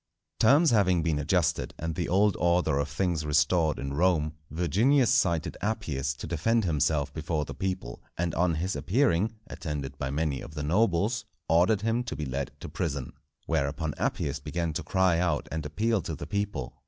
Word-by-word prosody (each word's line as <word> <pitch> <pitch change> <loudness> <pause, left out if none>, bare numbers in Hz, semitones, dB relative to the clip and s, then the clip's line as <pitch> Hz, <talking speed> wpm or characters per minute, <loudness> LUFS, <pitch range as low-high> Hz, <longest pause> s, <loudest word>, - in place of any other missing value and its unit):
_ - - -52
Terms 145 +8 +5
having 95 -6 +3
been 80 -3 0
adjusted, 85 +1 0
and 80 0 -3
the 85 +1 -2
old 100 +2 +3
order 85 -5 +2
of 70 0 -1
things 80 +2 -1
restored 75 +1 +2
in 70 0 -4
Rome, 80 -1 +2 0.2
Virginius 110 - +3
cited 85 -10 +1
Appius 75 -11 -2
to - - -7
defend 95 +8 +1
himself 75 -3 +1
before 80 -1 -2
the 70 - -7
people; 90 -6 -4 0.2
and 85 -2 -1
on 85 -1 +2
his 90 +5 -2
appearing 110 0 +1
attended 70 -4 -5
by 65 - -2
many 70 -1 -1
of 75 - -10
the 75 - -3
nobles, 105 +5 +1 0.2
ordered 90 +6 +3
him 115 +3 0
to 120 - -4
be 75 - -4
led 65 0 -3
to - - -6
prison. 70 -6 -3 0.3
Whereupon 75 +2 -1
Appius 70 +1 -1
began 85 +3 -3
to - - -2
cry 95 -3 +2
out 85 -4 0
and 80 0 -3
appeal 105 +7 0
to 80 -1 -4
the - - -7
people. 100 -11 -3
85 Hz, 180 wpm, -28 LUFS, 75-95 Hz, 0.3 s, Terms